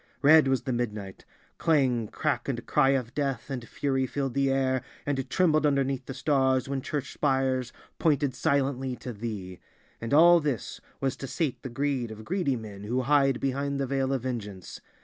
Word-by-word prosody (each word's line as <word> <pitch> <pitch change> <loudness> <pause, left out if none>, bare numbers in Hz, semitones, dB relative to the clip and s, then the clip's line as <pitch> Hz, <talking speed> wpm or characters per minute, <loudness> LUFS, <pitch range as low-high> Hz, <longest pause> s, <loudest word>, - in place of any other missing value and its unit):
Red 155 0 +7
was 130 -3 +1
the 130 - -2
midnight; 105 -5 -4 0.3
clang, 130 -8 +2
crack 150 +5 -2
and 120 -3 -3
cry 135 -3 +3
of 130 -3 0
death 140 -2 -2
and 125 -4 -5
fury 135 -2 0
filled 135 -1 -2
the 140 +1 +2
air 130 -1 +1 0.2
and 135 -2 -2
trembled 155 -5 +3
underneath 135 -3 +1
the 135 - -6
stars 130 -2 +2
when 135 -1 -2
church 140 0 -4
spires 130 -3 0 0.3
pointed 145 -4 +2
silently 135 -2 0
to 125 0 -7
Thee. 100 -5 -6 0.4
And 115 - -4
all 170 +4 +7
this 145 -8 -3 0.2
was 135 -2 0
to 135 - -6
sate 150 -1 -2
the 130 - -6
greed 130 -1 -1
of 110 0 -9
greedy 175 -7 0
men 105 -3 -8
who 125 +4 0
hide 135 -1 +3
behind 140 +1 -1
the 135 - 0
veil 135 0 0
of 135 -3 -1
vengeance! 105 -7 -6
135 Hz, 180 wpm, -28 LUFS, 120-140 Hz, 0.4 s, Red